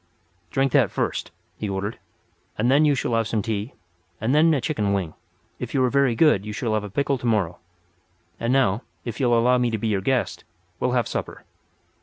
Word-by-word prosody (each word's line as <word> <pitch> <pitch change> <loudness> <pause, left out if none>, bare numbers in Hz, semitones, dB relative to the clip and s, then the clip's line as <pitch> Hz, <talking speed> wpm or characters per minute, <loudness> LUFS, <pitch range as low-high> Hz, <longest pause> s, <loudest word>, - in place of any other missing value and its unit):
"Drink 135 +4 +1
that - - +4
first" - - -2 0.3
he 105 - -3
ordered, 100 +3 -3 0.6
"and 120 +4 +2
then 145 +3 +5
you 145 -1 +4
shall 120 - -2
have 115 -1 +1
some 110 -3 -1
tea, 110 +1 -3 0.4
and 115 +5 0
then 160 +2 +5
a 150 - +2
chicken 105 -8 -1
wing. 90 -5 -2 0.5
If - - -5
you 130 - +3
are 125 - +2
very 140 -4 +3
good 130 -7 +4
you 105 0 -6
shall 110 +1 -2
have 110 -1 0
a 105 - -6
pickle 140 +5 0
to 120 - -3
morrow. 100 -7 0 0.8
And 115 - 0
now, 125 -5 +2 0.2
if 115 -2 -5
you'll 120 -3 +3
allow 125 +2 +4
me 120 -1 +2
to 110 - -1
be 110 +1 -2
your 100 -2 0
guest 130 +4 -1 0.4
we'll - - 0
have - - +1
supper." - - -5
115 Hz, 210 wpm, -24 LUFS, 105-135 Hz, 0.8 s, then